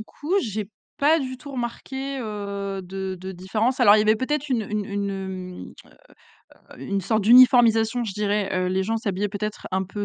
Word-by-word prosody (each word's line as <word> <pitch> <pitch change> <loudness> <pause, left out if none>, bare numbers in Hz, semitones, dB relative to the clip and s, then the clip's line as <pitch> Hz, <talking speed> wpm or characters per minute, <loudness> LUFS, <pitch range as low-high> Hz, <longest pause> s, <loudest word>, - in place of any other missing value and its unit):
coup, 290 - -7
j'ai 215 - -4 0.3
pas 305 +2 +4
du 260 -3 -4
tout 285 +3 -11
remarqué, 265 +2 -5
heu, 200 -3 -4
de 190 +1 -5
de 190 +1 -6
différence. 215 +8 -1
Alors, 210 -5 +7
il - - +3
y - - +4
avait 215 +1 +3
peut-être 295 +4 -2
une 245 -4 0
une 210 0 -3
une, 200 0 -2
heu 190 -2 -7
heu - - -21 0.9
heu, - - -15
une 200 0 -2
sorte 215 +3 0
d'uniformisation, 240 0 +6
je 210 - -4
dirais. 205 0 -1
Heu, 185 0 0
les 190 +1 0
gens 225 +4 -1
s'habillaient, 205 -2 -2
peut-être, 210 +1 -5
un 190 0 0
peu 205 +2 -5
210 Hz, 195 wpm, -24 LUFS, 195-245 Hz, 0.9 s, Alors